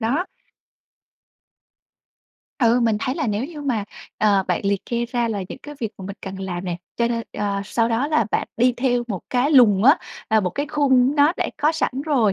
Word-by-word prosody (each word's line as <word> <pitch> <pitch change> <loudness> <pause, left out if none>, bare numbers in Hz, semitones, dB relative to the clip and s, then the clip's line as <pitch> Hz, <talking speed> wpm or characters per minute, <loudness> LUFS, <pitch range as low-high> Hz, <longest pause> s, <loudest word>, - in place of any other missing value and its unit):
đó! 275 +11 0 2.3
Ừ, 240 -1 +3
mình 225 -2 +2
thấy 260 +1 -1
là 310 -3 -2
nếu 210 +2 -1
như 300 0 -8
mà, 235 -7 -1 0.3
ờ, 200 -2 +3
bạn 180 - +1
liệt 200 -1 0
kê 235 0 -1
ra 240 -1 -1
là 205 -3 -2
những - - -8
cái 295 0 -9
việc 220 -3 -2
mà 190 - -8
mình 200 0 -7
cần 190 0 -6
làm 180 -1 -4
nè. 175 -2 -3 0.2
Cho 235 0 +1
nên 230 -1 -1
ờ, 200 -1 -2
sau 230 +2 0
đó 235 +5 0
là 270 -9 +2
bạn - - -1
đi 245 +1 +3
theo 245 -1 +1
một 195 -5 -3
cái 255 +3 +2
lùng 230 -8 +5
á, 285 +6 +7 0.3
à, 220 -1 +4
một 180 - -1
cái 285 +10 -3
khung 275 -3 +3
nó 290 +3 +5
đã - - -1
có 300 +2 +2
sẵn 320 - 0
rồi 250 -10 +2
235 Hz, 215 wpm, -22 LUFS, 205-275 Hz, 2.3 s, á